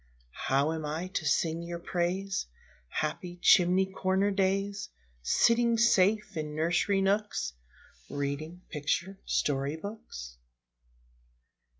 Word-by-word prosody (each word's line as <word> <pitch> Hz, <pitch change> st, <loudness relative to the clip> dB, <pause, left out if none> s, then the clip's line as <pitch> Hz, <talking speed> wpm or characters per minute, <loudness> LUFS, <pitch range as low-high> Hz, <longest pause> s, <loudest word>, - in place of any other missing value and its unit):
How 140 Hz, +3 st, +3 dB
am 160 Hz, -1 st, -4 dB
I 160 Hz, +5 st, -3 dB
to 170 Hz, -5 st, -2 dB
sing 165 Hz, +1 st, +1 dB
your 170 Hz, 0 st, -5 dB
praise, 180 Hz, -, -2 dB, 0.4 s
Happy 175 Hz, -, -3 dB
chimney 185 Hz, +1 st, +5 dB
corner 190 Hz, +1 st, 0 dB
days, 195 Hz, +1 st, 0 dB, 0.3 s
Sitting 235 Hz, -, +3 dB
safe 210 Hz, -2 st, +3 dB
in 150 Hz, -1 st, -4 dB
nursery 175 Hz, +5 st, +2 dB
nooks, 200 Hz, -, 0 dB, 0.6 s
Reading 150 Hz, +5 st, -4 dB
picture 170 Hz, +5 st, -2 dB
story 140 Hz, +1 st, 0 dB
books? 160 Hz, -, -8 dB
180 Hz, 100 wpm, -30 LUFS, 155-195 Hz, 0.6 s, chimney